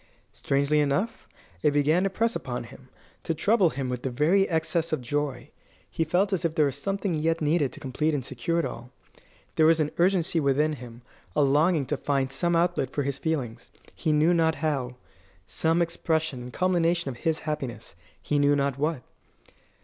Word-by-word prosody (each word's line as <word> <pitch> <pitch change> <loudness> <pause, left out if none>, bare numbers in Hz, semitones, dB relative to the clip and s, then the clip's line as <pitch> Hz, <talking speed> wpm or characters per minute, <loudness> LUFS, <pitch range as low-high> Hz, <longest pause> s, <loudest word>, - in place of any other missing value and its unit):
Strangely 140 +2 +1
enough, 150 +11 -1 0.3
it 150 - +4
began 145 +4 +2
to 195 - +1
press 230 +4 0
upon 120 -2 -4
him, 125 +2 -14 0.3
to 165 - -2
trouble 200 +2 +3
him 135 -2 -4
with 125 -1 -3
the 135 - -2
very 160 +10 +2
excess 165 0 0
of 155 - 0
joy. 135 +1 -3 0.4
He 165 - 0
felt 185 +6 +1
as 185 - 0
if 165 -1 -1
there 155 -3 +4
were 140 - +1
something 195 +7 -2
yet 165 +1 0
needed 150 -3 +1
to - - -11
complete 150 +4 -1
and 135 -4 -3
secure 170 +3 -2
it 170 - +1
all. 120 +1 -7 0.7
There 155 - +5
was 165 0 +4
an 150 -1 0
urgency 175 -2 +3
within 150 +2 +2
him, 120 -3 -10 0.3
a 150 - +4
longing 150 +2 +3
to 150 - -2
find 135 -2 -1
some 170 +5 0
outlet 170 -6 +1
for 145 - -2
his 140 0 -3
feelings, 130 -7 -3 0.2
he 160 - -1
knew 155 +3 +4
not 160 -1 +2
how 140 -5 -2 0.5
some 165 +2 +1
expression 160 -4 -2
and 125 +1 -8
culmination 170 -3 +1
of 125 - -7
his 160 +4 0
happiness, 140 - -5 0.2
he 145 - -1
knew 145 0 +4
not 140 -1 -1
what. 150 -3 -1
150 Hz, 190 wpm, -26 LUFS, 135-165 Hz, 0.7 s, There